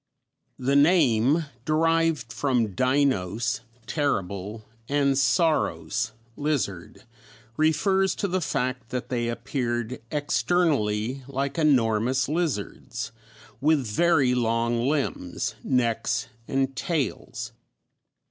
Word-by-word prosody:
The 135 +2 0
name, 145 -2 +4 0.2
derived 160 -4 +1
from 125 -7 0
deinos 125 -3 +1 0.2
terrible, 105 - -2 0.2
and 140 -1 +3
sauros 135 -5 +1 0.2
lizard, 135 - -2 0.5
refers 190 - +2
to 200 - -1
the 185 0 -1
fact 130 -5 -2
that 125 0 -4
they 120 -2 -1
appeared 120 0 -2
externally 135 -5 +1
like 140 +2 -2
enormous 125 -3 +2
lizards, 120 - -3 0.5
with 145 0 +2
very 135 +3 +3
long 120 0 +1
limbs, 135 - -2
necks, 120 -3 0 0.2
and 135 0 0
tails. 145 - -3
130 Hz, 90 wpm, -26 LUFS, 115-150 Hz, 0.5 s, name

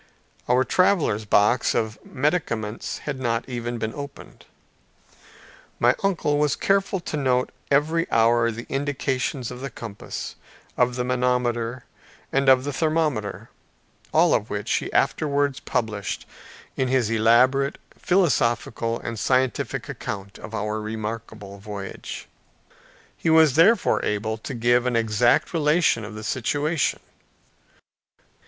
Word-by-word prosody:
Our 125 +1 +4
traveler's 150 - +2
box 105 +4 +3
of 110 -1 -1
medicaments 120 -7 -2
had 140 -3 -3
not 115 -2 -1
even 120 -1 -4
been 110 -1 -3
opened. 140 -1 -10 1.3
My 120 +1 +5
uncle 160 -7 +1
was 150 -1 +2
careful 195 0 +1
to 165 - -5
note 130 -3 +1 0.2
every 160 +4 +2
hour 115 +1 +3
the 115 +1 -6
indications 135 -3 -2
of 125 - -8
the 135 - -4
compass, 110 -6 -7 0.4
of 125 0 +2
the 125 - -1
manometer, 125 -1 0 0.5
and 135 0 +3
of 130 -1 +6
the 145 +1 -3
thermometer, 150 - -1 0.6
all - - +4
which - - -5
he - - -4
afterwards 145 -2 +1
published 105 -6 -3 0.5
in 130 - 0
his 125 -4 +1
elaborate 125 +5 +3 0.2
philosophical 120 - +1
and 115 -2 -5
scientific 130 +3 0
account 100 0 -6
of 110 - -8
our 105 0 -2
remarkable 110 -2 -6
voyage. 100 -1 -7 0.9
He 165 - -1
was 160 -3 +6
therefore 195 +5 +4
able 110 +1 -1
to 130 - -6
give 120 +1 +2
an 125 - 0
exact 115 - +2
relation 150 -6 +2
of 105 0 -8
the 110 - -7
situation. 145 +7 0
125 Hz, 120 wpm, -24 LUFS, 115-145 Hz, 1.3 s, of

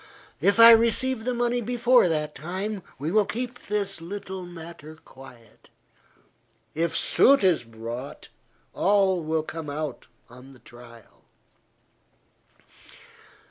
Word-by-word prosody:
If 200 +8 +2
I 230 0 +10
receive 230 +1 +2
the 250 - -1
money 240 0 0
before 245 -2 +3
that 150 -2 -2
time, 190 +6 -5 0.2
we 150 +5 -4
will 215 +2 +3
keep 245 +2 -6
this 200 -3 -3
little 190 0 -7
matter 165 -2 -11
quiet; 130 -7 -17 1.0
if 165 +1 -1
suit 275 -4 +4
is 180 -7 +3
brought, 115 +3 -9 0.4
all 195 -2 +2
will 160 0 -2
come 160 -1 -7
out 150 -2 -5 0.2
on 125 +2 -15
the 130 - -18
trial." 120 -2 -17
175 Hz, 115 wpm, -25 LUFS, 145-215 Hz, 1.0 s, I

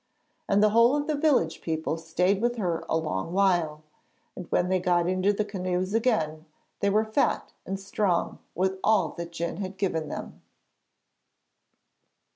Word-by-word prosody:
And 205 +1 +4
the 215 - +5
whole 230 +4 +5
of 290 0 -1
the 310 - -1
village 285 - +2
people 160 -1 -2
stayed 180 +5 0
with 240 +1 +1
her 180 -7 -1
a 160 - +2
long 160 - -3
while, 175 -6 +2 0.5
and 180 - -8
when 175 - +2
they 185 0 +1
got 175 -1 +2
into 185 +2 +2
the 205 +1 -1
canoes 185 -1 -2
again 165 -10 0 0.3
they 200 - +2
were 215 +2 +2
fat 220 +6 0
and 195 0 -3
strong 195 -2 -1 0.2
with 190 +1 0
all 215 -2 +3
that 170 -1 -7
Djun 170 +1 -4
had 190 -1 -5
given 165 -6 -1
them. - - -7
185 Hz, 160 wpm, -27 LUFS, 170-210 Hz, 0.5 s, the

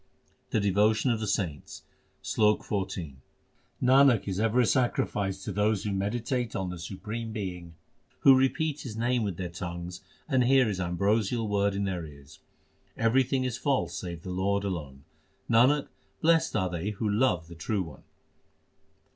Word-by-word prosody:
The - - +1
devotion 105 +5 +2
of 115 - 0
the 110 - -3
saints: 85 - -3 0.4
SLOK 105 -1 +2
XIV 95 -8 -3 0.7
Nanak 130 -3 +5
is 95 0 -2
ever 115 +3 +2
a - - +3
sacrifice 100 -6 0
to - - -4
those 105 +1 +1
who 105 - -2
meditate 115 +4 -2
on 95 -1 -2
the 90 - -7
Supreme 105 +6 -6
Being, 90 -6 -6 0.5
Who 135 - +8
repeat 145 +3 +1
His 115 -4 -7
name 120 +1 +1
with 100 -6 -2
their 90 - -3
tongues 85 +1 -6 0.3
and 130 -4 +3
hear 130 -1 +5
His 100 -3 -2
ambrosial 105 +6 0
word 100 -1 +1
with 100 0 -1
their 90 -3 -2
ears. 70 -1 -13 0.6
Everything 130 +3 +2
is 125 -1 -3
false 140 -2 0
save 85 -2 -6
the 90 - -5
Lord 100 +2 0
alone: 75 -8 -5 0.4
Nanak, 130 +6 +4 0.3
blest 165 0 +3
are 95 -4 0
they 85 +3 -3
who 105 +1 -3
love 100 -6 +1
the 85 - -10
True 95 +5 -2
One. 80 -6 -12
105 Hz, 160 wpm, -28 LUFS, 90-120 Hz, 0.7 s, Who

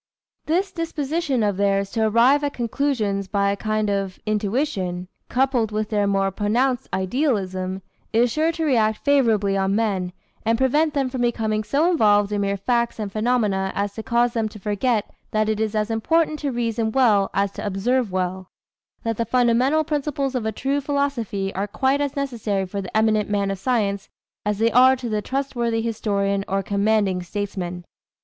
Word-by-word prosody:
This 370 +5 +1
disposition 320 -5 -1
of 205 -2 0
theirs 200 0 +1
to 220 -1 +1
arrive 245 +7 +4
at 285 - -1
conclusions 230 -5 -1
by 200 0 +1
a - - -1
kind 215 +1 -1
of 195 -2 -2
intuition, 205 -4 -1 0.2
coupled 250 -4 +1
with 215 +1 -2
their 205 -1 +2
more 195 -1 +1
pronounced 235 +6 0
idealism, 190 -4 -1 0.3
is 235 +2 +3
sure 315 +5 +1
to 325 -1 -2
react 220 -6 +1
favorably 225 -9 +3
on 195 0 +1
men, 195 -5 0 0.3
and 230 +1 +2
prevent 295 +5 +2
them 275 -2 +1
from 255 -1 -4
becoming 220 -3 0
so 290 +9 +1
involved 205 - +3
in 205 -1 0
mere 200 0 0
facts 235 +3 0
and 210 -3 -4
phenomena 215 -4 0
as 200 0 -1
to 220 - -5
cause 235 +1 +1
them 225 -2 0
to 215 - -11
forget 210 +2 0 0.2
that 215 0 +1
it 215 -1 0
is 220 0 -1
as 215 +1 0
important 310 +7 +1
to 285 -2 -2
reason 230 -2 -1
well 220 -6 +3
as 200 0 +1
to - - -7
observe 210 +3 0
well 185 0 -2 0.5
that 225 -2 -2
the 230 - +1
fundamental 250 +6 +3
principles 285 -3 -2
of 240 -4 -2
a - - 0
true 275 +6 -1
philosophy 265 -9 -1
are 195 +2 -2
quite 265 +6 +1
as 285 -1 -2
necessary 230 -8 -2
for 200 +2 -4
the 190 +3 -3
eminent 215 -1 +2
man 200 -1 0
of 195 - -4
science 200 -3 -1 0.4
as 210 -1 0
they 225 +2 +2
are 255 +3 +6
to 250 -2 -5
the 215 -1 -1
trustworthy 240 -3 -1
historian 200 -3 -1
or 195 0 -1
commanding 200 -2 +1
statesman. 180 -2 -5
220 Hz, 180 wpm, -22 LUFS, 200-255 Hz, 0.5 s, are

